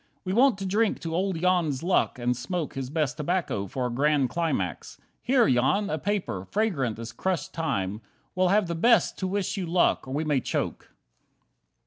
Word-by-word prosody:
We 185 Hz, -, -1 dB
want 250 Hz, 0 st, +4 dB
to 195 Hz, -, -5 dB
drink 210 Hz, +3 st, +1 dB
to 165 Hz, -1 st, -4 dB
old 185 Hz, 0 st, 0 dB
Jan's 170 Hz, -6 st, +1 dB
luck, 180 Hz, -6 st, +1 dB
and 125 Hz, 0 st, 0 dB
smoke 165 Hz, +6 st, -3 dB
His 135 Hz, -1 st, -4 dB
best 150 Hz, -1 st, -1 dB
tobacco 155 Hz, -, -1 dB
for 125 Hz, +6 st, -3 dB
a 125 Hz, -, -2 dB
grand 140 Hz, 0 st, +2 dB
climax. 140 Hz, -, -2 dB, 0.2 s
Here, 250 Hz, -1 st, +3 dB
Jan, 135 Hz, +12 st, +2 dB
a 155 Hz, -, -1 dB
paper, 190 Hz, -, -2 dB
fragrant 160 Hz, -, 0 dB
as 115 Hz, 0 st, -6 dB
crushed 180 Hz, +3 st, -2 dB
thyme, 105 Hz, -, -2 dB, 0.3 s
We'll 185 Hz, 0 st, +2 dB
have 205 Hz, +2 st, +3 dB
the 170 Hz, -, -3 dB
best 230 Hz, +7 st, +3 dB
to 190 Hz, -, -1 dB
wish 200 Hz, +1 st, -2 dB
you 185 Hz, -3 st, -3 dB
luck, 170 Hz, -4 st, +2 dB
or 130 Hz, -, -4 dB
may 155 Hz, -, 0 dB
we 145 Hz, -4 st, +1 dB
choke!" -, -, -3 dB
165 Hz, 185 wpm, -26 LUFS, 130-190 Hz, 0.3 s, want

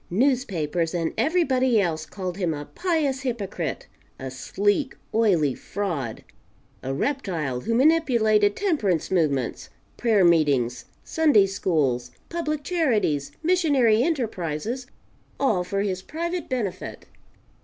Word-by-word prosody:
Newspapers 180 Hz, -, 0 dB
and 165 Hz, -2 st, -1 dB
everybody 260 Hz, -8 st, +2 dB
else 160 Hz, -5 st, -1 dB
called 185 Hz, +1 st, -5 dB
him 175 Hz, -5 st, 0 dB
a 145 Hz, 0 st, -6 dB
pious 310 Hz, -, -1 dB
hypocrite, 200 Hz, -, -3 dB, 0.3 s
a 130 Hz, 0 st, -6 dB
sleek, 205 Hz, -, 0 dB, 0.2 s
oily 180 Hz, -, +3 dB
fraud, 155 Hz, -, -4 dB, 0.6 s
a 130 Hz, -, -4 dB
reptile 165 Hz, -, -2 dB
who 230 Hz, -, -1 dB
manipulated 235 Hz, -8 st, +3 dB
temperance 220 Hz, -, 0 dB
movements, 145 Hz, -9 st, 0 dB, 0.3 s
prayer 215 Hz, -6 st, +3 dB
meetings, 145 Hz, -8 st, +2 dB, 0.2 s
Sunday 295 Hz, -11 st, +4 dB
schools, 150 Hz, -11 st, 0 dB, 0.2 s
public 305 Hz, -3 st, -2 dB
charities, 220 Hz, -, 0 dB
missionary 285 Hz, -11 st, +3 dB
enterprises, 235 Hz, -, -2 dB, 0.5 s
all 215 Hz, -10 st, +2 dB
for 195 Hz, +2 st, -2 dB
his 190 Hz, -2 st, -2 dB
private 340 Hz, -, -4 dB
benefit. 210 Hz, -8 st, -4 dB
205 Hz, 110 wpm, -24 LUFS, 160-270 Hz, 0.6 s, Sunday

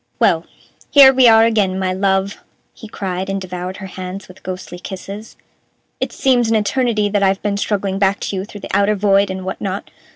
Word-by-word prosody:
"Well, -, -, +2 dB, 0.4 s
here 275 Hz, -2 st, +8 dB
we 255 Hz, -1 st, +5 dB
are 225 Hz, 0 st, +7 dB
again, 205 Hz, -5 st, +1 dB
my 185 Hz, -1 st, -1 dB
love!" 195 Hz, +1 st, 0 dB, 0.3 s
he 220 Hz, -, -11 dB
cried, 190 Hz, -3 st, -4 dB
and 195 Hz, 0 st, -2 dB
devoured 180 Hz, 0 st, -6 dB
her 190 Hz, -, -8 dB
hands 185 Hz, +1 st, -7 dB
with 185 Hz, 0 st, -15 dB
ghostly 180 Hz, -1 st, -7 dB
kisses. 200 Hz, +3 st, -8 dB, 0.6 s
"It -, -, -2 dB
seems 245 Hz, -4 st, +2 dB
an 225 Hz, -, +2 dB
eternity 215 Hz, 0 st, +1 dB
that 205 Hz, 0 st, 0 dB
I've 195 Hz, 0 st, +1 dB
been 205 Hz, -1 st, 0 dB
struggling 200 Hz, -2 st, -2 dB
back 195 Hz, 0 st, +2 dB
to -, -, -3 dB
you 190 Hz, -, -2 dB
through 205 Hz, 0 st, -11 dB
the -, -, -4 dB
outer 200 Hz, +1 st, +3 dB
void 200 Hz, 0 st, +2 dB
and 190 Hz, 0 st, -5 dB
what 190 Hz, -, -5 dB
not. 195 Hz, 0 st, -4 dB
195 Hz, 200 wpm, -18 LUFS, 190-210 Hz, 0.6 s, here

